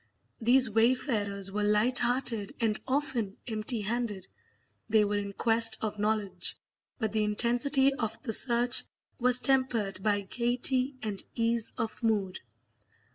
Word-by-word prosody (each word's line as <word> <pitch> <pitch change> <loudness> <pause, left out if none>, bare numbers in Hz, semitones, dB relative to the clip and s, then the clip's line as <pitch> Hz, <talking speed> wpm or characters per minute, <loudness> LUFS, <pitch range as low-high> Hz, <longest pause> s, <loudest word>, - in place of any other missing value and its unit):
These 245 +1 +4
wayfarers 215 -4 0
were 210 +1 -2
light 210 +4 +2
hearted 240 -4 -1
and 220 -2 0
often 260 -7 -2
empty 220 0 -1
handed; 210 -3 -3 0.6
they 215 -1 +4
were 205 0 -1
in 200 0 -5
quest 225 +2 +3
of 210 -1 -4
knowledge, 210 -1 -2 0.4
but 220 -4 -2
the 215 0 0
intensity 245 +6 +2
of 225 -4 -4
the 225 - -1
search 240 +1 +4 0.4
was 250 0 +4
tempered 240 -9 +1
by 205 0 +1
gaiety 250 +5 -1
and 205 -3 -4
ease 230 -1 0
of 225 -1 -4
mood. 205 -5 -1
225 Hz, 130 wpm, -29 LUFS, 210-245 Hz, 0.6 s, These